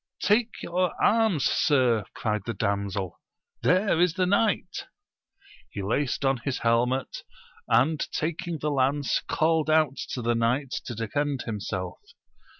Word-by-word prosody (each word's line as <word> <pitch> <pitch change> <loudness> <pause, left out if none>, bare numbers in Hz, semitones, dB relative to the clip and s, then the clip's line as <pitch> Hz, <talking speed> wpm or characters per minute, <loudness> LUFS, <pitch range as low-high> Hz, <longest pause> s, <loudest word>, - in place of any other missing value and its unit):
Take 220 +4 +1
your 180 +1 -1
arms, 220 - +3
sir, 125 - +2
cried 105 -2 -1
the 115 - -2
damsel, 100 -2 -2 0.4
there 185 -1 +3
is 175 -2 +3
the 185 -1 +2
knight! 205 +3 0 0.8
He 100 - -6
laced 135 +7 -1
on 135 0 +3
his 125 +2 -3
helmet, 120 +3 0 0.5
and 155 +5 +3
taking 170 +1 -2
the 150 0 -2
lance 140 +1 +1
called 160 -1 +2
out 155 -4 +3 0.2
to 125 - -3
the 120 +1 +2
knight 120 +4 0 0.2
to 120 - -4
defend 135 +5 -2
himself. 100 -4 -4
135 Hz, 135 wpm, -26 LUFS, 115-165 Hz, 0.8 s, arms